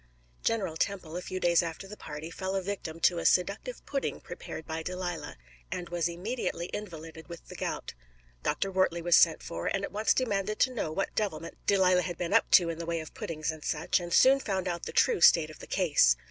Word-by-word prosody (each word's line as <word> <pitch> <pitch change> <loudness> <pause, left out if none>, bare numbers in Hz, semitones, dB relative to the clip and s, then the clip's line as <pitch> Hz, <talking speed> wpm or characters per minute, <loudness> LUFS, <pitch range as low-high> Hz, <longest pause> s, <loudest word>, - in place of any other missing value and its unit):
General 195 -8 0
Temple, 180 -5 -2
a 180 - -3
few 185 +1 -5
days 170 -2 +4
after 170 +3 -5
the 210 - -9
party, 155 -3 -7
fell 190 +1 -3
a 195 - +1
victim 180 -4 -5
to 175 0 +4
a - - -4
seductive 200 - 0
pudding 275 - -2
prepared 160 - -8
by 160 0 -4
Delilah, 180 - -4 0.3
and 175 -1 -4
was 170 -1 0
immediately 175 -1 -3
invalided 165 -5 -7
with 170 -1 -10
the - - -9
gout. - - -4 0.5
Dr. 195 - -1
Wortley 185 -3 +1
was 175 0 +5
sent 165 -2 +5
for, 85 +1 -4
and 195 - -1
at - - -4
once 215 +2 +2
demanded 215 -4 0
to 255 - +3
know 205 -10 -2
what 195 +5 -2
devilment 165 -7 -2
Delilah 185 -2 +4
had 175 -2 -4
been 170 -1 -2
up - - +4
to 175 -2 +6
in 165 0 -4
the 170 - -5
way 170 -1 -1
of 155 - -8
puddings 155 -1 -3
and 155 -1 -10
such, 165 +4 +1
and 175 -1 -6
soon 265 +8 +6
found 190 -7 -2
out 170 -1 -3
the - - -4
true 475 -4 +3
state 155 -2 +6
of - - -14
the - - -10
case. 145 - +4
175 Hz, 220 wpm, -29 LUFS, 165-195 Hz, 0.5 s, to